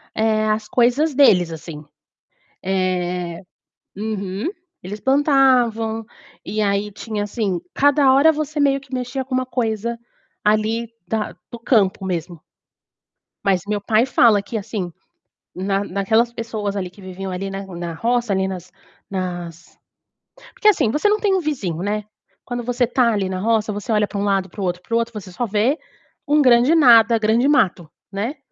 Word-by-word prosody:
eh, 220 0 +1
as 215 0 -1
coisas 260 +6 +2
deles, 180 - +5
assim. 155 -2 -8 0.8
Eh 180 -2 -1 0.5
uhum, 205 - -3 0.3
eles 205 +3 -7
plantavam, 250 -4 +2 0.4
e 215 +1 -2
aí, 205 0 0
tinha 210 0 -4
assim, 205 -3 -2
cada 285 -1 +4
hora 300 +4 +6
você 305 0 -3
meio 275 -1 +3
que 270 -1 -15
mexia 255 +1 -3
com 260 - -8
uma 255 0 0
coisa, 235 -2 -2 0.5
ali, 220 +2 +1 0.2
da 215 +1 -2 0.2
do 235 - -8
campo 200 -5 +2
mesmo. 175 -2 -4 1.0
Mas 190 -2 +2
meu 205 -1 -1
pai 220 +3 +2
fala 225 -5 +4
que 220 +2 -5
assim, 195 -3 -4 0.6
na 195 +2 -1
naquelas 220 +5 +1
pessoas 215 -3 -4
ali 185 -3 -3
que 190 +3 -17
viviam 190 0 -6
ali 195 +2 -4
na 195 0 -6
na 175 -2 -6
roça, 235 +4 0
ali 190 0 0
nas 185 -1 -7 0.4
nas 175 -3 -6 0.8
porque 425 - 0
assim, 295 - +2
você 300 +9 +2
não 425 0 +2
tem 400 -3 +2
um - - +2
vizinho, 200 - -3
né. 210 +1 -1 0.4
Quando 245 -1 -4
você 245 +1 +1
está, 240 0 +2
ali, 195 -2 0
na 185 - -3
roça, 220 +1 +1
você 205 +2 -5
olha 210 -1 +2
para 205 - -6
um 200 - -1
lado, 195 -2 0
para 200 - -8
o - - -1
outro, 180 0 -2
para 230 - -3
o - - +5
outro, 230 0 -2
você 195 -3 -8
só 240 +6 -2
vê 220 +8 +1 0.5
um 295 +1 +4
grande 250 +3 +5
nada, 235 -6 +6
grande 225 +4 +2
mato, 190 - +2 0.2
né. 220 +9 -3
215 Hz, 170 wpm, -20 LUFS, 190-245 Hz, 1.0 s, hora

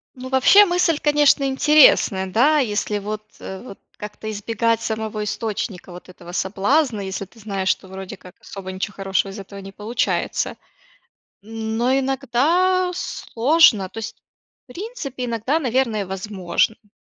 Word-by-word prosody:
Ну, 255 0 -8
вообще 265 +11 +6
мысль, 350 -3 +2
конечно, 295 -2 +3
интересная, 265 -8 +4
да, 255 +11 +3
если 210 -4 -1
вот, 210 +1 -5 0.2
вот 195 +2 -9 0.2
как-то 210 +1 -8
избегать 225 +2 0
самого 220 -1 -3
источника 210 -3 -4
вот 175 +1 -12
этого 175 -1 -12
соблазна, 210 - +1
если 195 0 -5
ты 225 - -22
знаешь, 195 -3 -3
что 190 - 0
вроде 190 0 -8
как 180 - -15
особо 190 -1 -8
ничего 190 +2 -4
хорошего 195 0 -1
из 195 - -9
этого 200 0 -9
не 195 0 -9
получается. 210 +4 -2 0.9
Но 225 +3 -2
иногда 320 +8 +1
сложно, 260 - +2
то 225 - -9
есть, 220 0 -6 0.5
в 250 - -15
принципе, 305 - -6
иногда, 235 +6 0
наверное, 240 -7 0
возможно. 190 +1 -1
То 210 - -30
220 Hz, 140 wpm, -21 LUFS, 195-265 Hz, 0.9 s, вообще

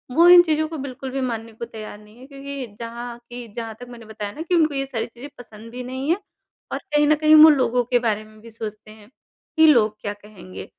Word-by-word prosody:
वो 335 +1 +6
इन 355 0 +10
चीज़ों 315 -2 0
को 320 0 -7
बिल्कुल 270 -1 -6
भी 270 +1 -3
मानने 230 -3 -4
को 230 +2 -7
तैयार 215 -2 -9
नहीं 210 +1 -19
हैं 255 +2 -14
क्योंकि 275 -1 -7
जहाँ 235 +1 -7
की 240 0 -8
जहाँ 225 -2 -5
तक 245 - -10
मैंने 235 -2 -12
बताया 210 -2 -6
ना 300 - -9
कि 345 +2 0
उनको 315 -3 +3
ये 275 0 -1
सारी 250 -4 -4
चीज़ें 245 +4 -12
पसंद 225 -1 -12
भी 250 +1 -7
नहीं 260 +3 -5
हैं 340 - +3 0.5
और - - -2
कहीं 295 0 +4
न 305 - +5
कहीं 310 +1 +5
वो 315 - +10
लोगों 250 -4 +2
के 245 - +4
बारे 215 -2 -1
में 215 0 -18
भी 230 - -13
सोचते 215 -1 -8
हैं 215 -1 -17 0.5
कि 320 0 +7
लोग 220 -8 +4
क्या 205 - -4
कहेंगे? 205 -3 -12
245 Hz, 245 wpm, -22 LUFS, 220-280 Hz, 0.5 s, इन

